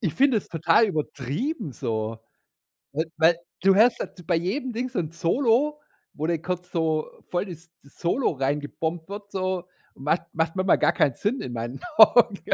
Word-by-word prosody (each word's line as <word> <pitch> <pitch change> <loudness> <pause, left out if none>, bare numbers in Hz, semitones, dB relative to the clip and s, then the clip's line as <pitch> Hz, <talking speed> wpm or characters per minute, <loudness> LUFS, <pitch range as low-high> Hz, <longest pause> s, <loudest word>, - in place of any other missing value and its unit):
Ich 180 - -1
finde 265 -3 +4
es - - -11
total 165 +7 +3
übertrieben 155 - -3
so, 110 -3 -3 0.8
we 155 +3 0
weil 165 +1 +5 0.3
du 195 0 +6
hörst 230 +4 +5
da - - -2 0.2
bei - - +2
jedem 215 - -2
Ding 245 +2 -3
so 215 - -2
'n 155 -3 -2
Solo, 250 - +1 0.3
wo 155 +2 -3
dann 165 -2 0
kurz 180 0 -4
so 160 -2 0 0.2
voll 180 +3 -1
das 175 -2 -10
das 140 - -19
Solo 180 +10 +1
rein 140 +1 -1
gebombt 160 +4 -4
wird 205 0 -7
so. 185 -1 -2 0.3
Macht 150 +5 0
macht 160 +1 -1
manchmal 185 0 +3
gar - - +3
keinen 135 -5 +2
Sinn 235 +6 -1
in 125 - -5
meinen 120 +2 -5 0.2
Augen. 230 -4 +7
175 Hz, 180 wpm, -25 LUFS, 155-210 Hz, 0.8 s, Augen